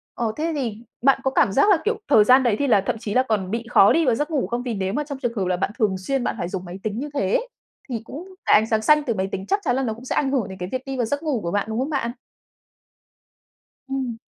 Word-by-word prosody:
ờ, 230 -2 -1
thế 325 +2 -1
thì 235 -6 -3 0.2
bạn 270 +2 +4
có 265 - +1
cảm 200 - +3
giác 280 - +4
là, 395 - +6
kiểu, 440 0 0
thời 215 -7 +7
gian 255 +4 +6
đấy 235 -4 +2
thì 285 - +1
là 205 -6 +4
thậm - - 0
chí 215 -3 -4
là 255 - +4
còn 205 -6 -1
bị 230 +1 -2
khó 200 -4 +6
đi 330 0 +2
vào 245 -4 +3
giấc 295 +5 -2
ngủ 275 -11 0
không? 240 +4 -3
Vì 245 -2 -3
nếu 190 -2 -2
mà 295 +5 -1
trong 280 -2 -6
trường 240 -3 -2
hợp 190 - 0
là 180 -1 0
bạn 195 - -1
thường 205 -4 +2
xuyên 260 +8 -2
bạn - - -1
phải 170 - -2
dùng 185 -1 -5
máy 180 +2 -8
tính 215 0 -3
như 290 +3 -4
thế 195 -9 0
ấy, - - 0 0.4
thì 235 -4 -3
cũng 350 +10 -9
cái - - +4
ánh 220 - -3
sáng 220 -1 +1
xanh 300 +5 +4
từ 240 - -1
máy 190 -2 -1
tính 190 0 -4
chắc 400 - +1
chắn 245 - +1
là 270 - 0
nó 225 -4 -1
cũng 235 +3 -12
sẽ - - -2
ảnh 270 -2 +1
hưởng 255 -7 0
đến 190 - -9
cái 180 -1 -5
việc 255 0 -2
đi 270 -1 -4
vào 245 - +1
giấc 285 +7 -3
ngủ 285 -8 -1
của 170 - -3
bạn, 205 +2 0
đúng 220 +1 -2
không 265 +3 -1
bạn? 270 -6 -1 1.8
Ừm. 260 -4 -3
240 Hz, 305 wpm, -23 LUFS, 205-275 Hz, 1.8 s, thời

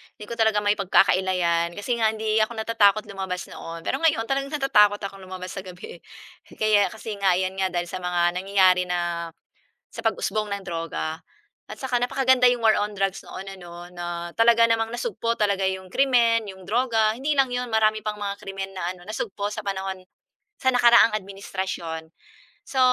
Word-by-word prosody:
hindi 210 - -10
ko 235 - -5
talaga 220 -2 +3
may 205 0 +2
pagkakaila 190 -1 +3
‘yan. 170 -1 +1
Kasi 235 +4 -2
nga 220 -1 +2
hindi 220 0 -1
ako 220 +2 0
natatakot 215 -2 +3
lumabas 190 -2 -5
noon. 165 0 -8
Pero 265 - -1
ngayon, 305 -8 +2
talagang 275 +1 -1
natatakot 210 -8 +4
akong 195 -1 -6
lumabas 185 0 -7
sa 195 - -6
gabi 180 -1 -10 0.6
kaya 215 -2 +3
kasi 220 -1 -7
nga 195 -2 +3
'yan 185 +1 -2
nga, 190 0 +1
dahil 175 0 -2
sa - - -4
mga 175 0 0
nangyayari 185 -1 +3
na 175 -1 -2 0.6
sa 230 - -7
pag-usbong 215 -1 -1
ng 200 - -12
droga. 165 -2 -4 0.5
At - - -8
saka 250 -2 -1
napakaganda 255 0 +4
'yong 245 -2 -1
War 220 - +6
on 205 0 -4
Drugs 195 0 -1
noon 190 - -9 0.2
ano, 175 0 -10
na 175 -1 -5
talaga 230 0 +5
namang 225 -1 +1
nasugpo 235 - -2
talaga 200 -3 +1
'yong 190 -1 -7
krimen, 235 -5 +3
'yong 190 -1 -11
droga 225 0 +2
hindi 280 +5 -2
lang 265 -2 +3
'yon 245 0 -2
marami 215 -1 +2
pang 210 0 -4
mga 200 -1 -4
krimen 195 0 -6
na 185 -2 -3
ano, 175 -1 -16
nasugpo 210 -1 -4
sa 215 - -5
panahon 190 -2 -4 0.6
sa 260 - +1
nakaraang 235 -3 +6
administrasyon. 190 -5 -5 0.5
So, 265 - -4
205 Hz, 180 wpm, -24 LUFS, 185-230 Hz, 0.6 s, War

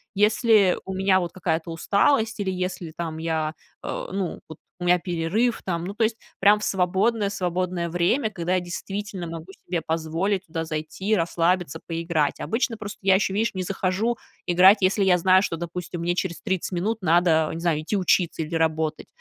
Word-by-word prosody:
Если 210 -2 +4
у 190 - -4
меня 190 0 +3
вот 175 -2 -4
какая-то 165 -2 -2
усталость 220 - +1
или 195 -2 -1
если 180 -3 -4
там 165 -2 -4
я, 160 -1 -2 0.3
э, - - -4
ну, 195 -3 -2
вот 160 - -10 0.2
у - - -5
меня 180 0 +4
перерыв 180 +8 0
там. 170 -2 -2
Ну, 200 +2 -6
то 225 - +1
есть 225 +1 +1 0.2
прям 205 +2 +5
в - - -7
свободное 200 +4 +1
свободное 180 -2 -2
время, 180 - +1
когда 180 -2 -2
я - - +2
действительно 190 +2 -5
могу 165 0 -7 0.2
себе 175 -2 -2
позволить 165 +5 -1
туда 165 0 -4
зайти, 155 +4 -5
и 215 - +5
расслабиться, 170 -2 0
поиграть. 165 -3 -1
Обычно 225 0 -1
просто 205 -2 -7
я 195 -1 +4
ещё, 190 0 +1
видишь, 220 0 0
не 185 - -2
захожу 195 +5 -1 0.3
играть, 185 +4 +6
если 195 +2 +3
я 185 -2 +4
знаю, 185 +2 +5
что, 180 -4 -2
допустим, 175 0 -5
мне 175 +1 0
через 175 -1 -3
30 190 -2 -2
минут 210 +5 -1
надо, 165 -2 +3
не 165 - -5
знаю, 165 -3 0
идти 200 +6 -1
учиться 175 -3 +1
или 155 - -8
работать. 160 -1 0
180 Hz, 185 wpm, -24 LUFS, 165-200 Hz, 0.3 s, играть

